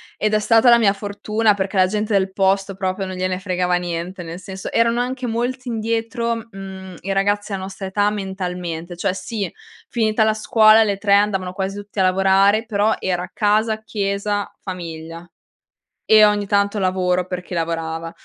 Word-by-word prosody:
ed 215 0 -1
è 215 - +4
stata 225 +3 +4
la 235 - +8
mia 205 -4 +3
fortuna, 210 +2 0
perché 195 0 -3
la 185 -1 +5
gente 210 +2 -2
del 190 -1 +2
posto 195 0 +1
proprio 190 0 -2
non 185 -1 -6
gliene 185 0 -1
fregava 180 -1 0
niente, 175 +1 -4
nel 165 +1 -7
senso 190 0 -7
erano 230 +1 +2
anche 255 0 -3
molti 245 +3 -2
indietro, 230 +1 -2
mhmm, 190 -2 -9
i 195 - -4
ragazzi 205 +2 0
della 195 -1 -3
nostra 195 0 -7
età, 205 +2 +1
mentalmente. 180 -4 -5
Cioè, 185 +1 -1
sì, 195 0 -4 0.4
finita 220 -3 +1
la 215 0 +3
scuola, 220 0 +5
le 200 -1 0
3 200 0 +1
andavano 195 -3 +1
quasi 190 +1 -3
tutti 205 0 -7
a - - +4
lavorare 195 +3 +3
però 215 0 +1
era 180 -1 -2
casa, 215 +1 +1
chiesa, 205 -1 -2
famiglia 165 -2 -7 0.8
e 215 -1 +7
ogni 205 -1 +1
tanto 200 +1 +1
lavoro 185 -1 +1
perché 180 0 -6
lavorava, 165 0 -3
195 Hz, 170 wpm, -20 LUFS, 185-215 Hz, 0.8 s, la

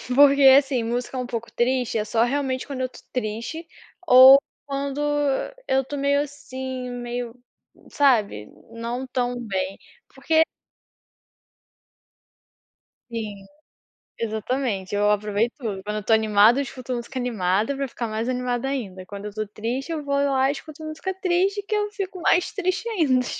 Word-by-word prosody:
Porque 280 0 +6 0.2
assim, 270 -4 +1
música 245 +3 -3
um 250 - -2
pouco 235 -2 -5
triste, 250 -1 0
é 210 - -1
só 225 +1 +2
realmente 265 0 -1
quando 270 -2 -5
eu - - +1
estou - - -15
triste, 250 +8 -4 0.4
ou 260 +1 +10 0.3
quando 280 0 -3 0.7
eu 265 0 +3
estou 285 +2 -6
meio 280 +1 +2
assim, 260 -3 -6
meio, 240 -1 -5 0.6
sabe, 215 - +2 0.2
não 235 +3 -4
tão 245 -1 -1
bem. 190 -1 -2 0.4
Porque 320 0 +3 2.7
Sim, 210 -4 -5 0.7
exatamente, 220 -2 -2
eu 205 +1 +2
aproveito 210 +3 +1
tudo. 210 -8 -4
Quando 210 +1 -4
eu 210 - -3
estou 225 - +1
animada 220 +3 +5
eu - - +1
escuto 255 -1 -6
música 240 +2 -5
animada 215 +1 0
para 275 0 -2
ficar 235 0 -5
mais 220 +2 -3
animada 250 0 -1
ainda, 195 -9 -4
quando 200 +1 -8
eu - - -3
estou 215 +1 -4
triste 235 +9 -4
eu 310 -2 -3
vou 280 0 -1
lá 275 -1 +2
e - - +3
escuto 310 +1 -9
música 310 +5 -4
triste 385 +3 +1
que 430 - 0
eu 415 0 0
fico 385 -3 -5
mais 350 +2 +2
triste 385 +4 -2
ainda. 280 - +2
250 Hz, 155 wpm, -24 LUFS, 220-280 Hz, 2.7 s, ou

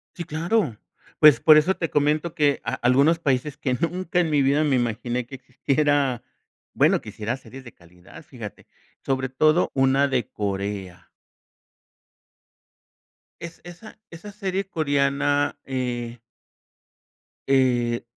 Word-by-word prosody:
Sí, 170 - -6
claro. 165 - -1 0.4
Pues, 150 -2 +7
por 155 -1 +7
eso 175 +5 +2
te 165 - -3
comento 150 +3 0
que 145 -2 +2
a - - -2
algunos 140 +7 +3
países 140 -2 -1
que 130 -2 -1
nunca 180 +5 -2
en 170 -2 +1
mi 145 -2 +2
vida 140 +3 +2
me 145 -3 +2
imaginé 120 0 -2
que 135 - -10
existiera, 140 0 0 0.5
bueno, - - +3
que - - -11
hiciera 115 +5 -4
series 135 0 -13
de 120 - -12
calidad, 90 - -16
fíjate, 115 -8 -10 0.4
sobre 130 -1 -1
todo 155 +6 +2
una 135 +1 +3
de 125 -5 -1
Corea. 100 -3 -5 2.3
Es 170 -1 -9
esa 175 +6 -13
esa 175 +5 -10
serie 195 -2 -3
coreana, 145 -2 0
eh 120 -3 -4 1.3
eh, 120 -3 +1
140 Hz, 130 wpm, -23 LUFS, 125-155 Hz, 2.3 s, Pues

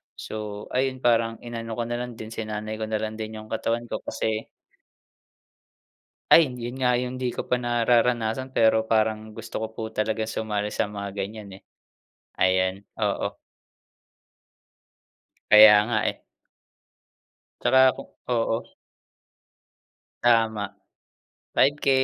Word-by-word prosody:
So, 105 -1 -6
ayun, 130 0 -1
parang 115 -1 +3
inano 115 -1 -5
ko 120 - -2
na 120 +1 -3
lang 125 -1 -5
din, 110 0 -9
sinanay 110 -1 -5
ko 110 - -3
na 110 0 -2
lang 110 0 -5
din 110 0 -5
yung 110 0 -10
katawan 115 +1 -1
ko - - -2
kasi 110 0 -3 1.8
Ay! 165 - +9
Yun 120 +1 -6
nga 125 -1 +2
yung 125 +1 -1
di 125 -1 -2
ko - - -3
pa 125 - +3
nararanasan. 120 +1 +1
Pero 110 -1 +3
parang 110 -1 0
gusto 115 +1 -7
ko - - -5
po 110 - -7
talaga 110 0 -1
sumali 105 -2 -2
sa - - -1
mga 100 -1 -6
ganyan, 100 -1 -6
eh. - - -21 0.8
Ayan, 95 +1 +2 0.2
oo. - - -1 2.1
Kaya 105 0 +10
nga, 115 - +1
eh. - - -9 1.4
Tsaka 130 +1 +6
kung - - -10 0.2
oo. 115 -1 +1 1.6
Tama! 110 -4 +2 0.8
5K, 145 +1 +3
110 Hz, 125 wpm, -25 LUFS, 110-120 Hz, 2.1 s, Kaya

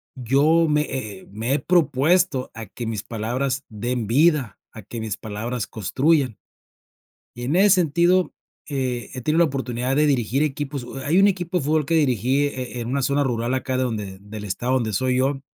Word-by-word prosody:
yo 145 +7 +3
me 150 -1 +2
he 110 -10 -5
he - - -16
me 110 +6 -2
he 145 - +2
propuesto 165 -2 +2
a 115 0 -7
que 115 +4 -7
mis 110 -2 -3
palabras 125 +5 -2
den 115 +1 -3
vida, 145 -1 +2
a 110 - -9
que 115 +4 -7
mis 110 -3 -4
palabras 110 +2 -4
construyan. 130 - +1 1.0
Y 120 - -8
en 145 +7 0
ese 200 +2 +5
sentido, 175 +2 +2 0.4
eh, 130 -4 -3
he 130 - -5
tenido 155 +5 +1
la 170 - +6
oportunidad 130 -1 -2
de 150 0 +4
dirigir 130 0 +1
equipos, 145 -3 -3
u 135 - -8
hay 150 +7 +1
un 195 - +6
equipo 180 -2 -1
de 145 - -4
fútbol 150 0 +1
que 165 - 0
dirigí 135 -1 +2
eh 130 -3 -5
eh - - -3
en 115 - -4
una 140 +3 0
zona 140 +2 +1
rural 120 0 -1
acá 130 0 -2
de 130 - +1
donde 105 -5 -4
del 105 +1 -8
estado 120 +6 -1
donde 115 -4 0
soy 130 +5 +1
yo. 135 +1 +1
130 Hz, 200 wpm, -23 LUFS, 115-150 Hz, 1.0 s, la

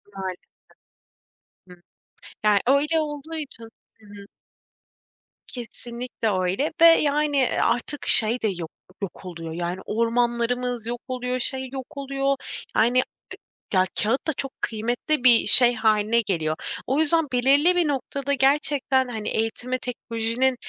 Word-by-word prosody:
Maalesef. 190 -2 -5 1.3
Hı. 180 -1 -15 0.6
Ya 210 -1 +4
öyle 295 +5 +3
olduğu 300 +1 -6
için 285 -7 -7 0.4
Hı 220 - -20
hı. 200 0 -11 1.2
Kesinlikle, 240 -1 -5
öyle 190 +11 -1
ve - - +9
yani; 300 -3 +4
eee, 260 -2 +1
artık 245 +5 0
şey 230 +2 +5
de 220 - +1
yok 175 -5 -4 0.3
yok 195 -1 -7
oluyor 165 -2 -7
yani, 175 +2 -3
ormanlarımız 235 +1 -1
yok 240 0 -4
oluyor, 250 0 -3
şey 260 +1 -3
yok 265 +1 -8
oluyor. 275 0 -1 0.4
Yani, 245 +3 +4 0.7
ya, 185 -1 +4 0.2
kağıt 230 +9 0
da 315 - +1
çok 270 0 -5
kıymetli 240 +6 -2
bir 240 -3 +6
şey 245 -1 +6
hâline 220 +1 +2
geliyor. 165 -7 -1 0.3
O 270 +4 +1
yüzden 320 0 +3
belirli 280 +8 +4
bir 350 -3 +2
noktada 280 0 -2
gerçekten, 275 -1 +2
hani, 220 -3 -4
eğitime 245 +3 -2
teknolojinin 240 +1 -1
245 Hz, 130 wpm, -24 LUFS, 220-275 Hz, 1.3 s, ve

